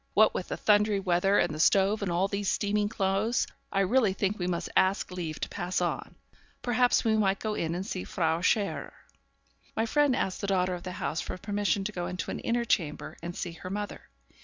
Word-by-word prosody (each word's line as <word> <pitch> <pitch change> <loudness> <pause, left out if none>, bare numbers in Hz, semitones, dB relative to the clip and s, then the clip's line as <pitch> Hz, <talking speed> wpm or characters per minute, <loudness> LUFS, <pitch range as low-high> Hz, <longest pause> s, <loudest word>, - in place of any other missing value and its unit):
What - - +6
with - - -3
the - - -4
thundery 210 -1 +3
weather, 190 +2 +2
and 165 - +2
the 155 - -6
stove, 195 +5 +4
and 195 -3 -1
all 180 +3 +2
these 200 0 -1
steaming 205 0 +1
clothes, 200 +3 +1 0.3
I 195 - +2
really 210 +1 +3
think 200 +1 -1
we 180 - -1
must 175 -2 -2
ask 190 0 +2
leave 165 -4 -4
to - - -2
pass 180 -1 -2
on. 175 -1 -2 0.5
Perhaps 245 0 +3
we 220 -2 +3
might 200 -2 +2
go 215 +1 -3
in 165 -4 -2
and 185 +2 -3
see 185 -3 -4
Frau 165 -1 0
Scherer.' 205 +2 0 0.8
My 225 - +1
friend 290 +2 +3
asked 190 -7 -2
the 200 - -2
daughter 185 -1 +1
of 175 - -5
the 180 0 -6
house - - -2
for - - -5
permission 205 +1 0
to 210 - -3
go 175 -3 -3
into 180 - -4
an - - -4
inner 235 0 0
chamber 165 -9 -1
and 175 +1 -5
see 175 - -4
her 165 +2 -8
mother. 205 +1 -5
195 Hz, 215 wpm, -29 LUFS, 180-210 Hz, 0.8 s, What